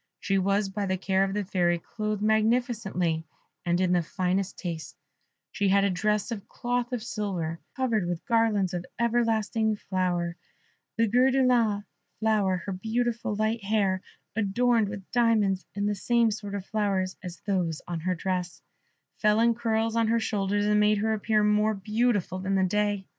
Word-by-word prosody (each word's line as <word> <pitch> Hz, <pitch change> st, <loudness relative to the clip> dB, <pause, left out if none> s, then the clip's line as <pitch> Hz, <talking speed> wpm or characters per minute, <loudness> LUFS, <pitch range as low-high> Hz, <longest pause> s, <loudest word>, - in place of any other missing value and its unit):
She 195 Hz, 0 st, +1 dB
was 200 Hz, +2 st, +1 dB
by 200 Hz, +1 st, -3 dB
the 190 Hz, 0 st, 0 dB
care 190 Hz, +1 st, +1 dB
of 195 Hz, 0 st, -2 dB
the 210 Hz, -, 0 dB
Fairy 175 Hz, -2 st, +1 dB
clothed 215 Hz, +3 st, -4 dB
magnificently 220 Hz, -7 st, +1 dB, 0.4 s
and 175 Hz, 0 st, +1 dB
in 185 Hz, -1 st, +2 dB
the 175 Hz, -1 st, +3 dB
finest 185 Hz, +3 st, -1 dB
taste: 165 Hz, -3 st, -6 dB, 0.5 s
she 200 Hz, -2 st, 0 dB
had 200 Hz, +1 st, +4 dB
a 200 Hz, -, +2 dB
dress 210 Hz, +4 st, 0 dB
of 205 Hz, -4 st, -5 dB
cloth 245 Hz, 0 st, -2 dB
of 245 Hz, -3 st, -3 dB
silver, 185 Hz, -8 st, -3 dB, 0.2 s
covered 230 Hz, -8 st, 0 dB
with 175 Hz, -1 st, -4 dB
garlands 225 Hz, -6 st, +2 dB
of 175 Hz, -1 st, -2 dB, 0.2 s
everlasting 225 Hz, -2 st, +1 dB
flower 175 Hz, -3 st, -2 dB, 0.6 s
of 225 Hz, -2 st, +2 dB
gris 255 Hz, +2 st, +4 dB
de 265 Hz, -1 st, +3 dB
lin 225 Hz, -5 st, +2 dB, 0.4 s
colour; 210 Hz, -4 st, +2 dB
her 200 Hz, -, -3 dB
beautiful 225 Hz, +3 st, -1 dB
light 215 Hz, +1 st, 0 dB
hair, 195 Hz, -2 st, +1 dB, 0.3 s
adorned 225 Hz, +1 st, +2 dB
with 200 Hz, -2 st, -7 dB
diamonds 215 Hz, -6 st, +2 dB
and 200 Hz, 0 st, 0 dB
the 210 Hz, -, +1 dB
same 230 Hz, +3 st, +2 dB
sort 205 Hz, -1 st, -5 dB
of 195 Hz, -2 st, -5 dB
flowers 195 Hz, -3 st, -1 dB
as 180 Hz, -1 st, -7 dB
those 180 Hz, -6 st, 0 dB
on 175 Hz, -1 st, -3 dB
her 180 Hz, +3 st, -1 dB
dress, 180 Hz, 0 st, -3 dB, 0.5 s
fell 210 Hz, 0 st, +3 dB
in 235 Hz, +1 st, +4 dB
curls 225 Hz, -1 st, 0 dB
on 230 Hz, -1 st, +2 dB
her 230 Hz, +1 st, +2 dB
shoulders, 205 Hz, -2 st, 0 dB
and 210 Hz, 0 st, +3 dB
made 210 Hz, 0 st, +4 dB
her 220 Hz, +2 st, +1 dB
appear 215 Hz, 0 st, +1 dB
more 210 Hz, +1 st, +3 dB
beautiful 210 Hz, -2 st, 0 dB
than 190 Hz, +1 st, -1 dB
the 190 Hz, -, +3 dB
day. 205 Hz, +1 st, 0 dB
205 Hz, 175 wpm, -27 LUFS, 190-225 Hz, 0.6 s, had